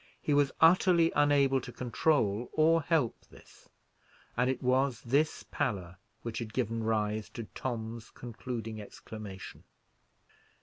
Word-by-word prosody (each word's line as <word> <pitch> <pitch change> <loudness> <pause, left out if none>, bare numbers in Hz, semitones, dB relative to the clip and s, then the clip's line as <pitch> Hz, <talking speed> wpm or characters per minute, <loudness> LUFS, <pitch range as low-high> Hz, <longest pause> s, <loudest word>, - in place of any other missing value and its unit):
He 150 - 0
was 145 -1 +3
utterly 170 0 +5
unable 140 -2 +4
to 125 - -8
control 120 -3 +1
or 165 +1 +4
help 145 -6 0
this, - - -18 0.7
and 125 +1 +2
it 130 - -1
was 130 -1 +2
this 140 +6 +1
pallor 95 - -2 0.3
which 115 -2 -4
had 110 -2 -6
given 115 -2 -1
rise 110 -1 0
to 115 - -6
Tom's 115 -2 -5
concluding 115 -2 -6
exclamation. 105 -2 -9
125 Hz, 125 wpm, -31 LUFS, 110-145 Hz, 0.7 s, utterly